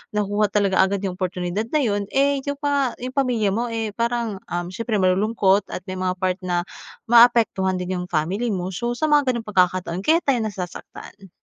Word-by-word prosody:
nakuha 205 0 +1
talaga 200 -3 +2
agad 195 +1 +2
yung 190 - -2
oportunidad 185 +3 -3
na 305 - +1
yun, 205 -3 -1
eh 275 0 +2
yun 285 +1 -4
pa 280 -3 0
yung 255 +1 -6
pamilya 240 -7 +1
mo 235 +3 -1
eh 225 -1 -2
parang 235 -4 -1
uhm, 175 0 -4
siyempre 230 +2 -3
malulungkot 195 +1 +2
at - - -6
may 185 -1 -6
mga 185 0 -1
part 185 0 -1
na 175 -1 -1 0.4
maapektuhan 230 -5 +4
din 180 0 -3
yung 180 - -5
family 180 +9 -1
mo. 185 -1 -3
So 235 +6 -3
sa 310 +4 -1
mga 290 -2 +4
gano'ng 235 -2 -4
pagkakataon 185 -3 +1
kaya 325 +2 +4
tayo 270 -3 +2
nasasaktan. 195 0 -7
205 Hz, 190 wpm, -22 LUFS, 185-240 Hz, 0.4 s, maapektuhan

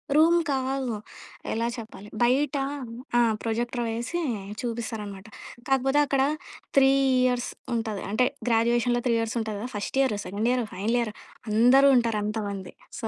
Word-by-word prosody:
Room 330 +3 +6
కాదు. 265 -2 -1 0.6
ఎలా 230 +1 0
చెప్పాలి! 215 -3 -9
బైట 260 +4 +3 0.6
ఆ! - - +6 0.2
ప్రొజెక్టర్ 240 +2 -1
వేసీ 235 +9 -3 0.4
చూపిస్తారనమాట. 220 -4 -5 0.4
కాకపోతే 270 +2 +3
అక్కడ 275 -1 +1 0.6
3 270 -1 +7 0.4
ఇయర్స్ 245 -1 0 0.3
ఉంటది. 220 -3 -2
అంటే 250 +4 +3 0.2
గ్రాడ్యుయేషన్‌లో 240 +1 +2
3 235 - +3
ఇయర్సుంట‌ది 225 0 -2
గద, 215 - -5
first 205 +5 -3
year, 260 -6 +1
second 205 +5 -2
year, 250 -2 +1
final 220 +6 0
year, 225 -3 -2 0.4
అందరూ 250 +6 +6
ఉంటారు 230 -3 +1
అంతమంది. 205 -3 -4 0.3
సో 225 - -3
235 Hz, 135 wpm, -26 LUFS, 220-255 Hz, 0.6 s, 3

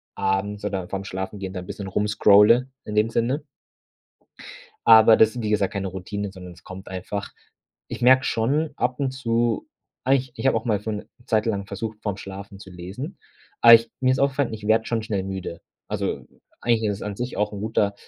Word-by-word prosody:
abends 100 +1 -1
oder 95 -3 -3
vorm 100 0 -4
Schlafengehen 95 0 -5
dann 90 -1 -6
'n - - -17
bisschen 100 -2 -6
rum 105 +2 0
scrolle 105 +5 +5 0.2
in 105 - -5
dem 110 +1 +3
Sinne. 125 +6 0 1.4
Aber 110 0 +8
das 110 0 +5
sind 125 - -5
wie 105 - -2
gesagt, 100 -2 +1
keine 100 -1 -3
Routinen, 95 +2 -5
sondern 90 -2 -10
es - - -18
kommt 95 +1 -10
einfach. 95 +2 -5 0.6
Ich - - -7
merke 130 +1 +6
schon 145 +8 0
ab 125 +3 -1
und 135 - 0
zu 120 -3 -1 0.4
eigentlich, 130 -1 +1
ich - - -2
habe - - +4
auch - - -2
mal 110 -4 +1
für 110 +2 -4
'ne 105 - -6 0.2
Zeit 110 -2 +2
lang 100 -3 -1
versucht, 105 +2 -5
vor 105 - -1
‘m - - -9
Schlafen 100 0 -9
zu 95 - -11
lesen, 100 - -7 0.4
aber 115 0 +10
ich 115 0 +4
mir 130 0 +3
ist 130 - 0
aufgefallen, 140 -3 +1
ich 105 -1 -8
werde 110 +1 +3
schon 115 -2 -1
schnell 100 -4 -2
müde. 95 -3 -5 0.3
Also, - - -3 0.4
eigentlich 115 -2 +1
ist 100 - -1
es - - -10
an 105 -1 -5
sich 125 +2 -4
auch 105 0 0
'n 100 - -6
guter 105 -2 0
105 Hz, 210 wpm, -24 LUFS, 100-115 Hz, 1.4 s, aber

